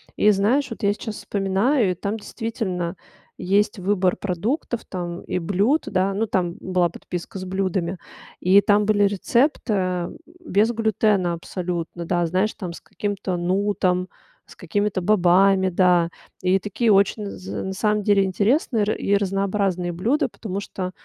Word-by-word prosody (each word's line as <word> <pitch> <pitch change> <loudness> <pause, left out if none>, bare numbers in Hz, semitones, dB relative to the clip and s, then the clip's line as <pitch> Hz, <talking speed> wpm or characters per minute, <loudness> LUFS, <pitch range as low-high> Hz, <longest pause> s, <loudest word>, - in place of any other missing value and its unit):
И 210 - +5
знаешь, 225 +8 +2
вот - - -7
я 200 -2 +3
сейчас 215 +1 -6
вспоминаю, 200 +4 +1
и - - 0
там 200 +5 -3
действительно 205 -6 -4 0.4
есть 205 +4 +1
выбор 185 -1 +1
продуктов 220 - -2
там 175 -1 -5
и - - -3
блюд, 200 - +1
да. 190 0 +1
Ну, 220 +3 +1
там 180 -5 -1
была 180 -2 +1
подписка 175 +3 -7
с 185 - -6
блюдами. 185 -1 -2 0.4
И 190 +3 +5
там 205 +1 +3
были 205 -1 +3
рецепт, 235 +8 +1
э, 185 -4 0 0.3
без 225 - +2
глютена 215 -5 +1
абсолютно, 170 0 -4
да. 175 0 +1
Знаешь, 185 +6 0
там 180 -4 -6
с - - -11
каким-то 200 -3 -3
нутом, 185 0 0 0.4
с - - -15
какими-то 200 +3 -1
бобами, 190 0 +4
да. 175 -2 +3 0.3
И 185 +1 +3
такие 210 +4 0
очень 200 +2 +3
з 185 +1 -6
на 190 - -3
самом 210 +1 0
деле 200 -1 +4
интересные 215 - +1
и 200 - -1
ра - - +3
разнообразные 195 -2 0
блюда. 225 - 0
Потому 200 -3 -5
что 185 -2 -5
195 Hz, 155 wpm, -23 LUFS, 180-210 Hz, 0.4 s, И